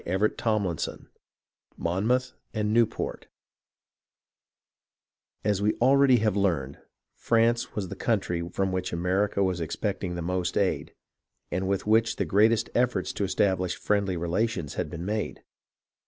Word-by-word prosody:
CHAPTER 95 +5 +1
XXIV 100 -8 -2 0.7
MONMOUTH 115 +9 0 0.2
AND 105 0 0
NEWPORT 115 -1 0 2.2
As 105 -2 +1
we 105 +1 +2
already 135 +1 +5
have 110 -3 +1
learned, 85 -9 0 0.3
France 115 +1 +1
was 95 -4 -3
the - - -6
country 95 -7 0
from 95 0 -1
which 95 0 -2
America 95 +4 +1
was 90 -2 0
expecting 90 +2 -3
the 85 - -4
most 90 +1 -1
aid, 100 -2 0 0.6
and 95 +2 -1
with 100 0 -1
which 115 +2 +3
the 100 - -1
greatest 110 +6 +3
efforts 125 0 +1
to - - -2
establish 95 -1 +1
friendly 100 -3 0
relations 85 -1 -1
had 90 -4 -3
been 85 +2 -6
made. 105 +1 -3
100 Hz, 130 wpm, -27 LUFS, 90-110 Hz, 2.2 s, already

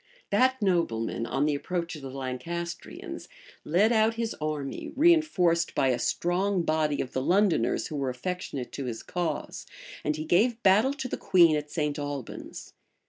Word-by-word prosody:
That 260 +5 +3
nobleman 115 - 0
on 135 +4 0
the 150 - +1
approach 170 +3 -3
of 150 - -9
the 135 - -7
Lancastrians, 135 +7 -6 0.4
led 195 +8 +3
out 220 0 +3
his 230 -1 -2
army, 150 -3 -3
reënforced 285 - +3
by 135 - +3
a 125 - +1
strong 180 +1 0
body 155 -2 +1
of 130 - -6
the 130 - 0
Londoners, 180 - +2
who 155 - -5
were 135 -2 -1
affectionate 135 -1 -4
to 140 - -5
his 115 -3 -5
cause; 175 -2 -4 0.4
and 150 - 0
he 155 0 -5
gave 225 +8 +2
battle 215 +8 +4
to 265 -3 -4
the - - -4
queen 170 -4 +5
at 150 0 -3
St. 150 -2 -2
Albans. 145 -3 -6
170 Hz, 165 wpm, -28 LUFS, 140-195 Hz, 0.4 s, queen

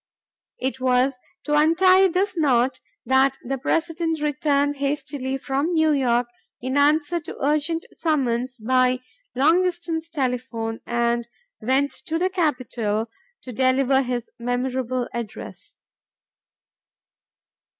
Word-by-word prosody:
It 260 +1 -3
was 255 +1 +2 0.3
to 295 - -2
untie 370 +5 +5
this 375 +2 0
knot 260 -5 +2 0.3
that 265 +1 +3
the 270 +2 -3
President 325 +2 -1
returned 290 -1 +1
hastily 275 -1 -2
from 275 +5 -1
New 315 -1 +4
York 245 -4 +2 0.3
in 260 +2 -3
answer 300 +4 +3
to 320 - -9
urgent 305 +3 0
summons 255 -5 -1
by 255 +2 +2 0.3
long 315 +7 +4
distance 340 -2 -2
telephone, 250 -6 -2
and 235 0 0 0.3
went 265 +5 +1 0.2
to 325 - 0
the 370 +2 0
Capitol 240 - -1 0.3
to 255 - -7
deliver 265 +2 +3
his 245 -2 -3
memorable 250 +1 -1
address. 235 -3 -7
270 Hz, 110 wpm, -23 LUFS, 250-315 Hz, 0.3 s, untie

